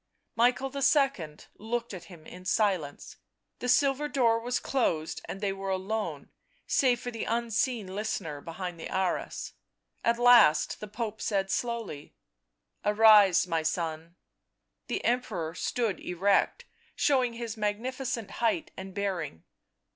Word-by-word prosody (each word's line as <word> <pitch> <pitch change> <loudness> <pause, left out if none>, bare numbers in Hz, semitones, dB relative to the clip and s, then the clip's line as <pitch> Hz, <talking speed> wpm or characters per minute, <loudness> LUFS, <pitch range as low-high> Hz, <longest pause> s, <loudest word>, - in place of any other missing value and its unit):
Michael 245 +3 +2
II. 275 - +2 0.2
looked 235 +2 -3
at 180 -2 -8
him 165 -3 -14
in 180 0 -11
silence; 185 -7 -1 0.4
the 250 - -3
silver 275 +3 +3
door 235 -6 +2
was 245 +2 -1
closed, 165 -12 -1
and 195 - -7
they 200 -2 0
were 195 0 -5
alone, 195 +3 -3 0.3
save 250 -3 +2
for 245 - -5
the 230 - -4
unseen 235 0 0
listener 170 -8 -3
behind 175 +1 -6
the - - -6
arras. 185 -1 -2 0.5
At 235 0 +2
last 240 -9 +5
the 210 - -7
Pope 220 0 -5
said 195 -3 0
slowly: 230 -11 -3 0.3
" - - -51
Arise, 210 -4 +6
my 165 -3 0
son." 160 +1 -3 0.7
The - - -3
Emperor 215 -10 -1
stood 220 +2 -1
erect, 200 - +1 0.3
showing 255 -4 +2
his 230 -1 -5
magnificent 230 +2 -3
height 305 +9 +1
and 190 0 -8
bearing. 190 - -3
215 Hz, 130 wpm, -29 LUFS, 185-240 Hz, 0.7 s, Arise